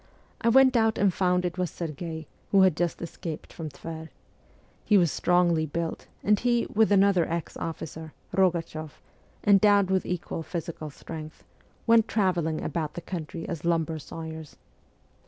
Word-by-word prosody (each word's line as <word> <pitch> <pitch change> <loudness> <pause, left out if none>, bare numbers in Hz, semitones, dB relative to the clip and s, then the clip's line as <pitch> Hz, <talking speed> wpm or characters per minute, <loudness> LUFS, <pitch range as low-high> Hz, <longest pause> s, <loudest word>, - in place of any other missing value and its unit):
I 230 - +3
went 260 +1 +6
out 225 -1 +3
and 195 -2 +3
found 180 0 +1
it 180 +1 -3
was 180 -2 0
Serghei, 160 0 -5 0.2
who 195 -1 +5
had 185 -5 +4
just 175 0 -1
escaped 165 -1 -7
from 160 -2 -6
Tver. 160 +2 -8 0.7
He 210 - +4
was 170 -5 +3
strongly 175 -3 +2
built, 165 +2 -4 0.2
and 210 0 +3
he, 240 -1 +2
with 220 0 +4
another 195 -3 +4
ex 170 0 -3
officer, 160 -1 -6 0.2
Rogachoff, 165 -4 0 0.5
endowed 200 -1 +5
with 190 -1 +1
equal 175 -2 -3
physical 165 -2 -5
strength, 155 +2 -9 0.4
went 230 -1 +5
travelling 175 -7 0
about 155 -3 -3
the 175 - -5
country 165 -2 -6
as 170 -5 -5
lumber 165 -2 0
sawyers. 160 0 -8
170 Hz, 150 wpm, -27 LUFS, 160-195 Hz, 0.7 s, went